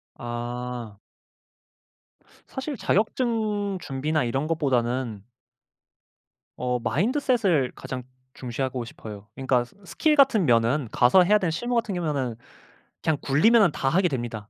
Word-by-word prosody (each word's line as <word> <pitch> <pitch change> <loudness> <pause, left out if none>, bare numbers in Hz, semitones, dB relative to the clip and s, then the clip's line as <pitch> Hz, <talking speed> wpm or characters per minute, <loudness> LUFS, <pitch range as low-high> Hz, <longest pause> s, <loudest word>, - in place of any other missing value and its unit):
아. 120 -2 -5 1.5
사실 265 +1 -5
자격증 215 -2 0
준비나 150 +2 -1
이런 135 +5 -1
것보다는 125 -8 -1 1.3
어 125 0 -1
마인드셋을 190 - +1
가장 125 -1 -6 0.3
중시하고 125 0 -4
싶어요. 105 -2 -10
그니까 130 -2 +1
스 125 - -22
스킬 310 - +1
같은 265 - +4
면은 120 +2 +2
가서 125 +10 +5
해야 210 +4 +4
되는 180 -5 0
실무 240 +9 -2
같은 220 -4 0
경우에는 140 -9 -2 0.7
그냥 160 -2 +1
굴리면은 195 - +4
다 135 - -1
하게 180 +5 +3
됩니다. 120 -7 -4
140 Hz, 275 characters per minute, -25 LUFS, 120-200 Hz, 1.5 s, 가서